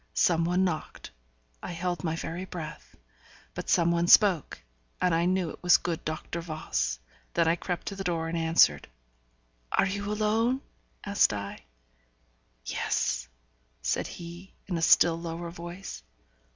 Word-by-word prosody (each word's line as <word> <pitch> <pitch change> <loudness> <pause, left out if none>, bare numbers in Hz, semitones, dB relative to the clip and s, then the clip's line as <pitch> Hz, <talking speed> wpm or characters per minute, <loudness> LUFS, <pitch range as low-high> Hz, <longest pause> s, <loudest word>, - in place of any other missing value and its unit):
Some 165 -2 +3
one 180 +2 +2
knocked; 175 -4 -3 0.5
I - - -5
held 175 +1 -2
my 160 -1 -1
very 165 +2 -4
breath. 155 - -8 0.6
But - - -6
some 170 -1 +4
one 170 0 +1
spoke, 190 -5 +5 0.4
and 180 -2 +2
I 165 +1 +2
knew 180 -2 +1
it - - -12
was 180 -1 +6
the - - -21
good 170 -2 -2
Doctor 155 +2 -4
Voss. 155 - -2 0.4
Then 170 -1 +3
I 165 - +4
crept 175 0 -4
to 200 - -7
the 195 - -5
door, 165 -3 -1
and 165 - -3
answered. 160 - +4 0.8
'Are - - +3
you 200 +1 -3
alone?' 220 +5 +1 0.4
asked - - +3
I. - - -6 1.0
'Yes,' - - -1 0.6
said - - 0
he, 175 +2 -10
in 185 - -3
a 165 - -1
still 165 0 +5
lower 170 0 -5
voice. 175 - -8
170 Hz, 150 wpm, -28 LUFS, 165-185 Hz, 1.0 s, was